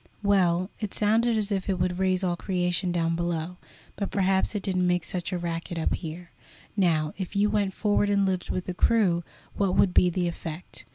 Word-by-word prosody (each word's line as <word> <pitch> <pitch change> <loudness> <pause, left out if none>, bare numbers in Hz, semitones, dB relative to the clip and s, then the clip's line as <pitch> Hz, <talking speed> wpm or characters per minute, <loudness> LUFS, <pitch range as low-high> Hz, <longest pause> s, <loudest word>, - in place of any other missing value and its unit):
"Well, 185 -2 +2
it 210 -3 -4
sounded 225 +2 +2
as 210 -1 -1
if 195 -1 -1
it 190 - +1
would 180 0 0
raise 185 0 +1
all 175 -2 +1
creation 180 0 -1
down 165 -1 0
below, 170 0 -2 0.4
but 200 - -3
perhaps 190 +1 +1
it 200 - -2
didn't 185 -2 +1
make 180 -1 +1
such 180 0 -3
a 180 - -1
racket 170 0 -4
up 160 - 0
here. 170 +1 -6 0.4
Now, 160 -6 +2
if 190 +1 -5
you 205 +1 +3
went 200 -3 0
forward 205 -1 +1
and 200 -1 +3
lived 185 -2 -1
with 185 - -2
the 180 - -3
crew, 180 -4 +2 0.3
what 195 -2 +1
would 185 - +3
be 180 - +5
the 175 0 -1
effect? 170 0 -6
185 Hz, 205 wpm, -26 LUFS, 175-200 Hz, 0.4 s, be